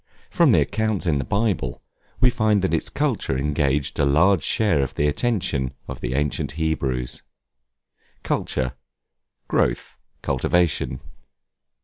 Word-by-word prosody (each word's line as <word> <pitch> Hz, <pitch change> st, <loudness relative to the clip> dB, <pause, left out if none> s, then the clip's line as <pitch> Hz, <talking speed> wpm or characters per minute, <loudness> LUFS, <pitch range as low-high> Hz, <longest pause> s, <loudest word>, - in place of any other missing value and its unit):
From -, -, +4 dB
the -, -, +5 dB
accounts 110 Hz, -2 st, -1 dB
in 75 Hz, -5 st, +1 dB
the -, -, -1 dB
Bible, 95 Hz, -, -1 dB, 0.4 s
we 125 Hz, -, +5 dB
find 110 Hz, -5 st, +2 dB
that 95 Hz, -, 0 dB
its 80 Hz, -, 0 dB
culture 65 Hz, -, -1 dB
engaged 70 Hz, 0 st, 0 dB
a -, -, +3 dB
large 80 Hz, +6 st, +4 dB
share 105 Hz, -, +2 dB
of 70 Hz, -, -3 dB
the 75 Hz, -, +1 dB
attention 75 Hz, -, -1 dB
of -, -, -7 dB
the 60 Hz, +1 st, -2 dB
ancient 75 Hz, 0 st, -1 dB
Hebrews. 70 Hz, -6 st, -2 dB, 1.0 s
Culture, 65 Hz, 0 st, -1 dB, 0.7 s
growth, -, -, -1 dB, 0.2 s
cultivation. 75 Hz, -7 st, 0 dB
75 Hz, 125 wpm, -23 LUFS, 65-100 Hz, 1.0 s, the